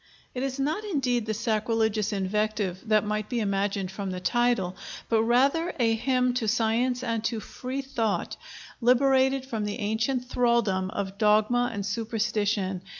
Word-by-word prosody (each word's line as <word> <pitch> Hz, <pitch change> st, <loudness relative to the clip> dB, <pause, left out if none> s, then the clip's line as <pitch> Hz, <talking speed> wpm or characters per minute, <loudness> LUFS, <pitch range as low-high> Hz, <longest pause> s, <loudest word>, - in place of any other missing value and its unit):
It 250 Hz, -, -4 dB
is 270 Hz, 0 st, -3 dB
not 310 Hz, +9 st, -1 dB
indeed 255 Hz, -, 0 dB
the 215 Hz, -, 0 dB
sacrilegious 220 Hz, -1 st, 0 dB
invective 205 Hz, -1 st, -1 dB
that 215 Hz, -1 st, +4 dB
might 210 Hz, 0 st, -2 dB
be 245 Hz, -, -1 dB
imagined 200 Hz, -2 st, -1 dB
from 195 Hz, 0 st, -4 dB
the 185 Hz, 0 st, -4 dB
title, 235 Hz, -4 st, +1 dB, 0.3 s
but 225 Hz, -1 st, +3 dB
rather 275 Hz, +9 st, +2 dB
a 230 Hz, -2 st, +3 dB
hymn 250 Hz, +2 st, +1 dB
to 230 Hz, -3 st, -1 dB
Science 240 Hz, +3 st, +1 dB
and 230 Hz, -3 st, -1 dB
to 230 Hz, -1 st, -1 dB
Free 260 Hz, +5 st, -5 dB
Thought, 230 Hz, -6 st, -2 dB, 0.5 s
liberated 265 Hz, +2 st, +3 dB
from 225 Hz, -5 st, -3 dB
the 205 Hz, +1 st, -3 dB
ancient 225 Hz, +4 st, -1 dB
thraldom 235 Hz, -7 st, +1 dB
of 195 Hz, 0 st, -5 dB
dogma 215 Hz, +3 st, +3 dB
and 200 Hz, -3 st, -4 dB
superstition. 210 Hz, -3 st, -1 dB
225 Hz, 150 wpm, -27 LUFS, 210-250 Hz, 0.5 s, that